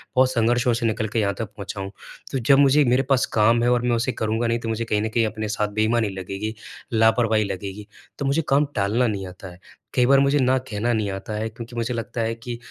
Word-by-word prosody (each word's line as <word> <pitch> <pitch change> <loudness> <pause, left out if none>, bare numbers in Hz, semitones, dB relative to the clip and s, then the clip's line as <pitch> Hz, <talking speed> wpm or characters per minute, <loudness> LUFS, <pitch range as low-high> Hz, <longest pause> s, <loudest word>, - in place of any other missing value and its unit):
और 130 0 +5
संघर्षों 120 0 +2
से 115 +1 -1
निकल 110 -1 0
के 115 +2 -1
यहाँ 100 -2 +1
तक 115 - -2
पहुँचा 100 0 -6
हूँ। 95 0 -6 0.4
तो 135 - -1
जब 135 +3 +4
मुझे 140 +1 +5
मेरे 125 +2 +3
पास 135 -2 +3
काम 115 +2 +4
है 120 - +3
और 125 -1 +2
मैं 120 0 +1
उसे 120 +3 0
करूँगा 110 0 -1
नहीं, 115 0 0
तो 115 - -5
मुझे 115 +1 -2
कहीं 105 -2 0
न 110 - -1
कहीं 115 +1 +1
अपने 110 0 -3
साथ 105 0 0
बेईमानी 110 +1 +1
लगेगी, 95 +3 -5 0.4
लापरवाही 110 -1 +3
लगेगी। 100 +1 -6 0.3
तो 140 - -2
मुझे 140 +4 +2
काम 140 +2 +4
टालना 110 +4 +1
नहीं 100 -3 -3
आता 90 +1 -10
है। 90 - -15 0.3
कई 125 - +3
बार 135 +2 +5
मुझे 140 +1 +3
ना 130 0 +3
कहना 120 -2 -2
नहीं 110 -3 0
आता 95 +3 -6
है, 110 +1 -2
क्योंकि 115 +2 -10
मुझे 120 +1 -2
लगता 115 0 -4
है 115 0 0
कि 120 +1 -7
115 Hz, 245 wpm, -23 LUFS, 105-125 Hz, 0.4 s, और